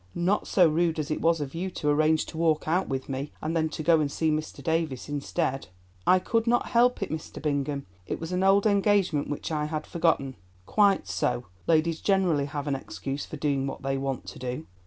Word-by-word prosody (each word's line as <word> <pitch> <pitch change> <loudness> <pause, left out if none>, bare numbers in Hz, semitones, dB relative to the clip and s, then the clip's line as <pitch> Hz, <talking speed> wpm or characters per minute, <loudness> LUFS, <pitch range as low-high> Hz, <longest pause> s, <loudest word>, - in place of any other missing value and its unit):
"Not 180 +4 +1
so 180 -3 +5
rude 165 +1 +1
as 155 0 -3
it - - -1
was 165 -1 +2
of 135 -2 -4
you 180 +3 -3
to 155 - -4
arrange 155 +1 +3
to 160 - -9
walk 160 -2 +2
out 180 +4 +1
with 135 -1 -3
me 135 +2 -4
and 160 +2 -3
then 160 -1 +1
to 155 - -5
go 165 0 +5
and 145 -2 0
see 160 +1 +1
Mr. 155 0 -3
Davies 160 -6 -1
instead." 135 -5 -2 0.4
"I 185 - +7
could 225 +5 0
not 240 +1 +2
help 245 -2 +3
it, - - -5
Mr. 160 0 -6
Bingham; 145 -1 -1 0.2
it - - -3
was 165 +2 -5
an 180 0 0
old 195 +2 +4
engagement, 200 -7 +2
which 145 - -4
I 150 -1 0
had 155 0 -3
forgotten." 160 -6 0 0.3
"Quite 200 - +3
so, 120 +7 -1 0.2
ladies 165 0 +2
generally 180 -8 +2
have 145 -1 -4
an 140 -2 0
excuse 135 +1 -5
for 155 - -7
doing 140 -2 0
what 135 - -6
they 135 0 0
want 135 -2 -3
to - - -11
do." 125 +4 -4
155 Hz, 220 wpm, -27 LUFS, 140-175 Hz, 0.4 s, I